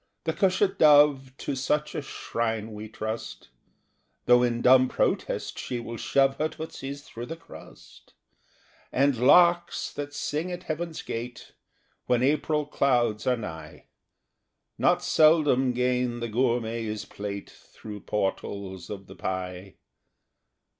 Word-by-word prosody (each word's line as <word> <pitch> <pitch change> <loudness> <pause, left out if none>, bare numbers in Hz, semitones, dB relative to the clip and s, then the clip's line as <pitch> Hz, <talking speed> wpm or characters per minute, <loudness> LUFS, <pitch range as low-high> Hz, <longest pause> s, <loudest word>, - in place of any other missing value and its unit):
The 160 - -1
cushat 195 +1 +1
dove 145 -3 +6
To 140 - -3
such 150 +3 -1
a - - -3
shrine 115 -5 -3
we 105 +1 -8
trust, 110 - -6 0.8
Though 125 0 +6
in 120 -1 0
dumb 130 0 +6
protest - - -1
she 125 - -4
will 115 0 -6
shove 135 +3 +2
Her 155 +1 0
tootsies 140 -3 -7
through 120 -3 -8
the 165 - -5
crust; 165 - -15 0.8
And 140 +1 +3
larks, 170 +8 +4
that 145 0 -5
sing 155 +4 -3
at 180 0 -6
Heaven's 165 0 -4
gate 120 +2 -6 0.6
When 125 -1 +2
April 150 +2 +1
clouds 120 -7 +1
are 125 -1 +3
high, 80 -8 -8 0.9
Not - - +3
seldom 150 -5 +4
gain 125 -1 0
the 115 0 -4
gourmet's 115 -2 -1
plate 100 -1 -6
Through 105 -1 -11
portals 95 -2 -3
of 100 -2 -7
the - - -13
pie. 95 0 -5
125 Hz, 125 wpm, -27 LUFS, 110-150 Hz, 0.9 s, dove